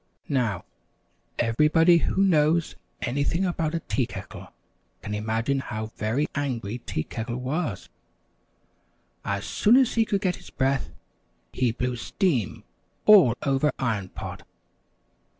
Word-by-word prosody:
Now, 115 - 0 0.7
everybody 150 +9 +4
who 190 +3 +1
knows 165 -2 +2 0.3
anything 145 +8 0
about 165 -3 -1
a 165 - -2
tea 130 -5 -1
kettle - - -9 0.6
can 105 - -4
imagine 110 +6 -1
how 110 -4 -5
very 115 +8 0
angry 125 -6 -3
Tea 75 -9 -3
Kettle 120 +6 -5
was. 135 +8 -3 1.4
As - - -2
soon 220 +3 +3
as 265 -3 +3
he 225 -1 +3
could 200 -2 -1
get 180 -3 0
his - - -14
breath, 135 -1 0 0.6
he 125 -2 +1
blew 125 +2 -2
steam 120 - -1 0.4
all 185 - +7
over 140 +2 +2
Iron 105 -7 -1
Pot. - - -7
135 Hz, 125 wpm, -25 LUFS, 115-165 Hz, 1.4 s, all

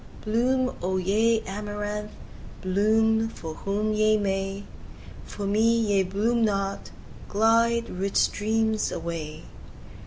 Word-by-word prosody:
Bloom, 255 +4 +1
O 185 +1 -1
ye 220 +5 +2
amaranths! 210 +1 -5 0.5
bloom 220 +4 +2
for 160 -7 -7
whom 210 +5 -2
ye 215 0 +3
may, 195 0 -2 0.6
For 205 - -6
me 220 +3 +3
ye 205 -4 +2
bloom 215 +5 0
not! 195 -2 -1 0.4
Glide, 230 +2 +3
rich 195 +2 -4
streams, 220 +1 +1
away! 165 -2 -5
210 Hz, 105 wpm, -26 LUFS, 195-225 Hz, 0.6 s, ye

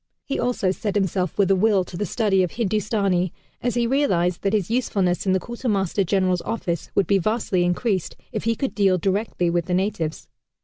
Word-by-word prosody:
He 275 - -2
also 235 -6 +1
set 205 +1 -3
himself 190 -3 0
with 195 -2 +3
a - - +5
will 200 0 +3
to 180 - -10
the 205 +3 -2
study 200 -1 +2
of 180 - -1
Hindustani, 200 -5 0 0.3
as 245 -1 -1
he 240 -1 +2
realized 185 -10 +1
that 195 - 0
his 210 -1 0
usefulness 200 -7 0
in 190 - +4
the 190 - +2
Quartermaster 205 -5 -1
General's 185 -1 +1
office 185 -7 -3
would 195 - +3
be 200 -1 +3
vastly 210 -2 0
increased 185 +1 0 0.2
if - - -4
he 230 0 +2
could 270 +4 -2
deal 195 -3 +3
directly 190 -2 0
with 170 -1 0
the 180 -1 0
natives. 185 -5 -2
195 Hz, 195 wpm, -23 LUFS, 180-220 Hz, 0.3 s, a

